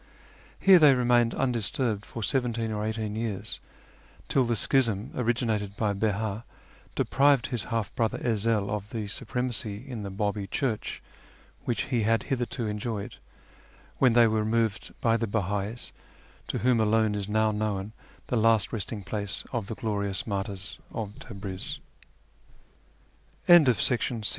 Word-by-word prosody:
Here 190 -2 +7
they 145 -4 +7
remained 120 -1 +3
undisturbed 115 -3 -1
for 115 - -6
seventeen 115 -3 0
or 105 -1 -2
eighteen 110 -1 -2
years, 110 -4 -3 0.7
till 130 -2 +3
the 120 0 +1
schism 115 -3 +2
originated 110 -4 -1
by 105 -2 +1
Beh;i 105 +1 -1 0.5
deprived 140 -2 +3
his 120 - 0
half 115 -4 -2
brother 115 -2 0
Ezel 110 -3 +1
of 105 -1 -3
the 110 -2 -4
supremacy 110 -1 -3
in 120 -5 -5
the 100 - -5
B;ibi 100 0 -2
Church 110 +2 -2 0.6
which 120 - 0
he 120 - +3
had 115 +1 +2
hitherto 120 -2 -2
enjoyed, 105 0 -4 0.8
when 130 -3 +5
they 120 0 +7
were 110 0 +1
removed 110 -1 0
by 115 -1 +3
the 115 0 -1
Beha'is, 105 +2 -2 0.6
to - - -2
whom 125 -1 +3
alone 110 0 +3
is 100 -1 -3
now 110 0 +2
known 105 -1 -2 0.3
the 125 - -1
last 110 -1 +3
resting 105 -1 -4
place 100 0 -3
of 115 -5 -2
the 110 - -4
gloriou 100 -3 -2
110 Hz, 130 wpm, -28 LUFS, 105-120 Hz, 0.8 s, Here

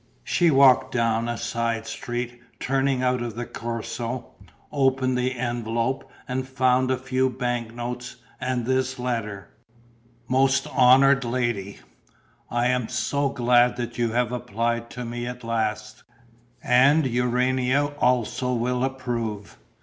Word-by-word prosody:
She 175 -2 +2
walked 135 -3 +5
down 115 -1 +1
a 120 - -2
side 115 0 -2
street 120 0 -5 0.2
turning 135 -1 0
out 125 -1 +1
of 120 -3 -4
the 120 +1 -4
Corso, 115 +1 -5 0.4
opened 130 -2 +1
the 125 +1 -1
envelope 120 +1 -2 0.2
and 130 0 -3
found 130 -1 +2
a 130 - +1
few 130 0 0
bank 120 -3 -3
*notes 120 +1 -5 0.2
and 125 -2 -2
this 130 +1 0
letter: 115 -5 -3 0.8
"Most 135 +2 +2
honoured 135 +2 +5
Lady, 120 -5 -2 0.7
"I 120 0 0
am 125 -2 +1
so 140 -1 0
glad 125 -1 +3
that 120 0 -5
you 120 -1 +1
have 120 -1 +1
applied 115 0 -2
to 125 -1 -6
me 120 +1 -4
at 125 0 -7
last; 110 -1 -2 0.6
and 140 +5 +5
Urania 130 +3 +1
also 125 +1 +1
will 125 +1 0
approve. 120 -6 -4
125 Hz, 130 wpm, -24 LUFS, 115-130 Hz, 0.8 s, walked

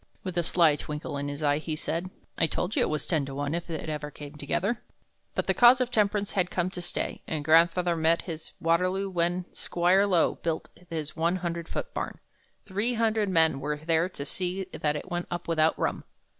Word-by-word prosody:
With 185 -2 -4
a 175 - +3
sly 165 -3 +3
twinkle 150 0 -5
in 140 0 -2
his 145 +2 -5
eye 145 0 +3
he 155 0 -3
said, 165 +4 -3 0.3
'I 165 - +5
told 180 +5 -2
you - - +3
it - - +2
was 155 -2 -1
ten 160 -5 +1
to 135 - -6
one 145 +1 -2
if 170 +1 -3
it 160 -1 -4
ever 150 -1 -3
came 145 0 -10
together.' 170 - -1 0.5
"But - - 0
the - - +2
cause 245 +1 +7
of 250 -1 0
temperance 205 -2 +1
had 180 -3 +1
come 180 0 -1
to 180 - -5
stay, 175 - -2
and 150 -2 -3
grandfather 170 +2 +4
met 165 +1 +2
his 165 -3 -7
Waterloo 185 +4 +1
when 175 0 0
Squire 180 +3 +2
Low 180 -4 +2
built 165 -1 -2 0.2
his 155 -3 -4
one 170 +2 +1
hundred 170 -2 -3
foot - - -4
barn. - - -3 0.5
Three 210 +5 0
hundred 220 -2 +1
men 160 -5 +3
were 150 +2 -2
there 165 +3 +1
to 140 -6 -6
see 185 +4 -2
that 150 -1 0
it 175 +5 -6
went 175 0 -2
up 175 0 -4
without 160 -1 +3
rum. - - -1
170 Hz, 210 wpm, -28 LUFS, 155-185 Hz, 0.5 s, cause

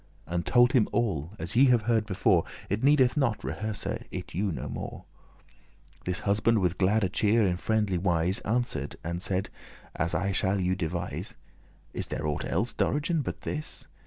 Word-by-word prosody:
" - - -31
And 85 0 -3
told 120 0 +5
him 125 -6 +3
all, 95 -8 -1
as 85 +2 -6
ye 130 +3 +7
have 120 -4 +4
heard 110 -1 +1
before: 95 -3 +3 0.3
It 105 +2 0
needeth 135 -3 +5
not 135 -7 +1
rehearse 100 +10 -4
it - - -5
you 100 +3 0
no - - -4
more. - - -6 1.0
This 90 0 -2
husband 110 +3 +2
with 90 -3 0
glad 100 +2 +3
cheer,* 110 +1 +3
in 90 -2 +1
friendly 105 -2 0
wise, 90 +2 +1
*demeanour 110 +1 -1
Answer'd 80 - -2
and 85 +2 -3
said, 95 0 -1 0.5
as 85 +1 -1
I 100 +4 0
shall 95 0 +1
you 90 0 +1
devise.* 90 0 -3
*relate - - -5 0.6
"Is - - -1
there 75 - -4
aught 75 -1 -1
elles, - - -1
Dorigen, 150 +2 0
but - - -5
this?" 150 0 -5
100 Hz, 185 wpm, -28 LUFS, 90-115 Hz, 1.0 s, ye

